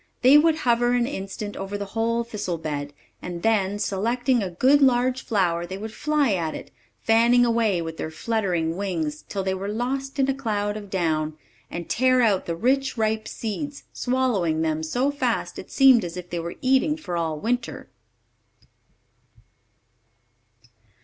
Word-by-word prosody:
They 260 +3 +7
would 310 +1 +6
hover 240 0 +3
an 245 -1 +2
instant 205 -4 -5
over 195 +1 -4
the 200 - -4
whole 230 +1 0
thistle 210 -7 -4
bed, 145 -2 -4 0.3
and 175 -1 -6
then, 205 -3 +2
selecting 235 +5 0
a 190 - -2
good 260 +11 +3
large 255 0 +3
flower, 175 -5 +1
they 185 +2 -6
would 215 +2 -7
fly 295 -6 +1
at 165 -4 -2
it, - - -9 0.3
fanning 235 +2 +5
away 225 -7 +1
with 165 0 -6
their - - -4
fluttering 175 -4 -1
wings 165 -7 -2
till 195 -2 -2
they 190 0 0
were 190 +1 -4
lost 265 +6 -3
in 270 -1 +2
a 270 - +2
cloud 210 -6 -2
of 205 -2 -8
down, 155 -4 -1 0.3
and 170 -1 -6
tear 255 0 +3
out 205 -5 +2
the 170 - -1
rich, 265 +7 +1
ripe 220 0 0
seeds, 280 +6 -5
swallowing 215 -11 0
them 160 -1 -1
so 245 - 0
fast 255 -5 -2
it - - -10
seemed 265 -4 +6
as 175 0 -6
if 180 -1 -8
they 175 - -2
were 170 +1 -5
eating 270 +4 +3
for 180 - -5
all 160 -2 -2
winter. 240 +5 -2
215 Hz, 165 wpm, -24 LUFS, 175-250 Hz, 0.3 s, They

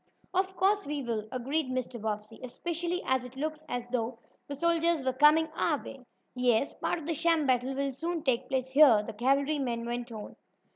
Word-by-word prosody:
"Of 380 +1 0
course 395 +1 +2
we 290 -1 -3
will," 220 -3 -3
agreed 265 +3 -1
Mr. 255 -2 -3
Bobbsey. 215 +1 -4
"Especially 340 +7 -3
as 260 -1 +1
it 250 +1 -10
looks 310 +2 -4
as 245 -1 -3
though 240 -1 -2 0.3
the 285 - -5
soldiers 335 0 +2
were 260 - +1
coming 300 +4 +5
our 310 -3 +1
way." 270 -1 -10 0.3
"Yes, 250 0 +2
part - - -2
of 325 - -8
the 330 - -1
sham 330 0 +2
battle 255 0 +1
will 275 0 -1
soon 330 +4 -3
take 255 -1 0
place 260 -1 -1
here," 265 -7 +7
the - - -6
cavalryman 265 0 0
went 240 0 -4
on. 215 -2 -8
270 Hz, 190 wpm, -30 LUFS, 245-315 Hz, 0.3 s, here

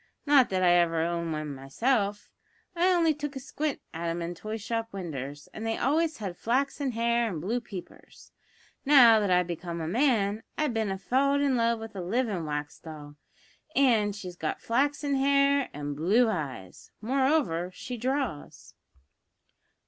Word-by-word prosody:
Not 280 -4 +5
that 185 -1 0
I 175 - +5
ever 165 -2 +2
owned 170 -1 -2
one 155 -2 -4
myself; 205 - -1 0.4
I 355 +2 +3
only 335 -3 +3
took 295 -1 -5
a - - -4
squint 285 +2 -3
at 170 +1 -4
'em 165 +1 -2
in 170 +1 -4
toy 215 +5 -5
shop 225 +1 -3
winders, 145 -6 -6
and 220 - -7
they 225 0 -1
always 310 +4 +1
had 195 -5 -5
flaxen 270 +4 -1
hair 235 0 +1
and 170 -6 -4
blue 225 +9 -2
peepers. 195 -5 -11 0.5
Now 250 -6 +7
that 205 -2 0
I've 180 0 +3
become 170 0 -5
a 160 - -3
man, 220 - +1 0.2
I've 300 -5 0
bin 220 -2 0
an' 195 - -2
falled 275 +7 +1
in 280 -2 +2
love 230 -1 +2
with 220 -1 -9
a 190 - -4
livin' 195 -3 -1
wax 150 0 -4
doll, 150 -2 -10 0.6
an' 225 -7 +3
she's 185 -3 -8
got 160 -3 -3
flaxen 285 +4 0
hair 280 0 +3
an' 145 0 -5
blue 195 +12 +3
eyes; 140 - -5
moreover, 255 - +1
she 245 +7 -7
draws." 255 - -3
220 Hz, 165 wpm, -28 LUFS, 170-265 Hz, 0.6 s, Now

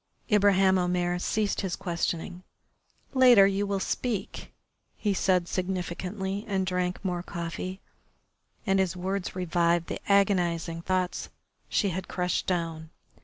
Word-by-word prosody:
Ibraheim 195 -2 +5
Omair 180 0 0
ceased 210 +1 0
his 190 -3 -2
questioning. 175 0 -3 0.7
"Later 250 -6 +7
you 200 +1 +1
will 200 -1 -1
speak," 220 +2 -3 0.5
he 205 -2 0
said 185 -2 +2
significantly, 190 +2 -3
and 190 -2 0
drank 180 +1 -2
more 180 -2 -1
coffee. 175 +2 -5 0.8
And 195 -2 +2
his 190 -1 0
words 190 +1 -3
revived 170 -1 +1
the - - -3
agonising 175 -4 +2
thoughts 185 0 -1 0.4
she 200 - +1
had 185 +1 -4
crushed 180 0 -1
down. 165 -3 -2
185 Hz, 120 wpm, -28 LUFS, 175-195 Hz, 0.8 s, Later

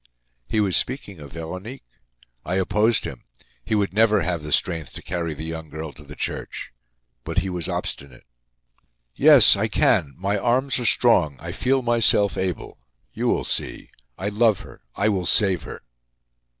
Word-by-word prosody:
He 110 - 0
was 100 -4 +2
speaking 110 - 0
of 70 -2 -11
Veronique. 90 - -7 0.6
I 90 - -2
opposed 105 +4 +1
him. - - -8 0.4
He 110 - -1
would 100 -2 0
never 110 -1 +3
have 85 -3 -2
the 75 0 -7
strength 80 -6 0
to - - -9
carry 85 -3 -3
the 80 - -6
young 80 -1 -6
girl 80 -1 -7
to 75 - -15
the 75 +1 -12
church. - - -5 0.5
But 80 +6 -6
he 95 0 0
was 90 -2 -4
obstinate. 65 -3 -5 0.9
"Yes, 140 -8 +7
I 105 +3 0
can! 95 - +1
My 100 +2 -1
arms 130 +4 +1
are 120 - -3
strong. 90 - +4
I - - -6
feel 130 0 0
myself 115 -4 +3
able. 95 -4 -4 0.3
You - - -2
will - - +1
see. - - -3 0.3
I 100 - -2
love 105 -1 +2
her—I 65 - -5
will 95 -5 0
save 95 -2 +3
her!" - - -9
95 Hz, 165 wpm, -23 LUFS, 80-110 Hz, 0.9 s, Yes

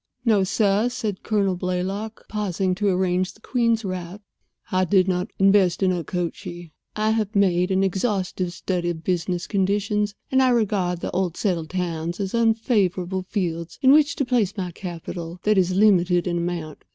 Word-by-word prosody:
"No, 215 -4 +4
sir," 205 +3 +2
said 215 -5 -4
Colonel 200 -4 +1
Blaylock, 185 +5 -3
pausing 195 -3 -1
to 205 +3 -1
arrange 185 0 0
the - - -22
queen's 230 -2 0
wrap. 185 +2 -5 0.5
"I 185 -1 +2
did 185 +1 +3
not 180 +2 -1
invest 195 -2 +4
in 185 - +3
Okochee. 175 0 -4 0.2
I 215 +1 +1
have 220 -1 -1
made 180 -2 +3
an 190 0 +2
exhaustive 190 -2 -1
study 175 -1 -2
of 165 -1 -5
business 175 0 -1
conditions, 205 +1 0 0.2
and 265 0 +4
I 260 - +4
regard 195 -7 0
old 180 -2 -1
settled 170 -6 -1
towns 170 -1 -3
as 195 -2 -3
unfavorable 200 -5 +1
fields 170 -4 -3
in 260 - +7
which 300 +2 +5
to 280 - -1
place 235 -6 +1 0.2
capital 170 -1 -7
that 210 -2 +3
is 185 0 +1
limited 180 -4 +4
in 175 -1 -1
amount. 170 -3 -4
190 Hz, 160 wpm, -23 LUFS, 180-210 Hz, 0.5 s, in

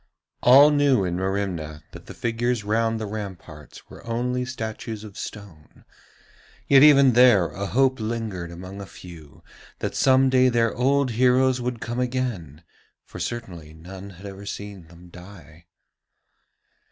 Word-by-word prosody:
All 140 +4 +7
knew 140 -8 +2
in 90 -1 -2
Merimna 90 -5 -3
that - - -13
the - - -10
figures 120 0 -2
round 115 +2 0
the 110 - -4
ramparts 95 -8 -9
were - - -14
only 125 +2 -2
statues 110 -3 -6
of 105 -3 -11
stone, 95 -8 -11 0.8
yet 135 -1 +6
even 140 -3 +6
there 115 -8 +5
a 100 +6 -5
hope 130 +3 +1
lingered 110 -6 -4
among 95 +3 -9
a 100 - -9
few 85 -7 -14 0.3
that - - -4
some 130 0 +3
day 130 0 +4
their 115 -3 +1
old 135 +1 +1
heroes 125 +2 +2
would 120 -1 -4
come 120 +1 -4
again, 120 - -3 0.4
for - - -11
certainly 90 -10 -6
none 95 +4 -11
had 95 +1 -14
ever 100 0 -9
seen 100 -5 -8
them 85 +1 -16
die. 90 -2 -15
110 Hz, 145 wpm, -23 LUFS, 90-125 Hz, 0.8 s, All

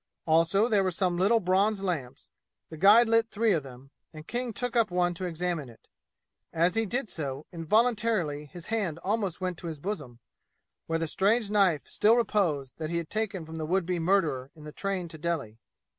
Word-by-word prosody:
Also 165 +7 +3
there 210 -4 +2
were 185 - +1
some 180 0 0
little 200 +6 +3
bronze 195 +2 +1
lamps; 155 -10 -4 0.4
the - - -7
guide 205 +8 +6
lit 230 0 +3
three 220 +1 +1
of 165 -5 +2
them, 135 0 -13 0.2
and 155 -1 -11
King 245 0 -3
took 245 +3 -3
up 230 -3 +3
one 175 0 +1
to 185 +2 -5
examine 170 -4 -3
it. 115 - -19 0.6
As 170 +2 +2
he 225 0 0
did 245 +4 -2
so, 140 -5 -4
involuntarily 205 -4 +1
his 170 +4 -9
hand 190 -8 -1
almost 200 -3 -1
went 180 -2 -3
to 175 - -7
his 160 -2 -5
bosom, 145 - -5 0.7
where 165 - 0
the 165 - -1
strange 205 +6 +1
knife 190 -7 +3
still 220 +2 +3
reposed 170 - 0
that 155 -1 -4
he 170 - -1
had 170 -2 -5
taken 210 -5 -2
from 160 0 -8
the 155 - -2
would 185 +1 +1
be 180 0 -1
murderer 160 -7 +1
in 155 - -14
the 150 - -8
train 195 0 -3
to 160 -1 -9
Delhi. 150 -10 -3
180 Hz, 200 wpm, -28 LUFS, 160-210 Hz, 0.7 s, guide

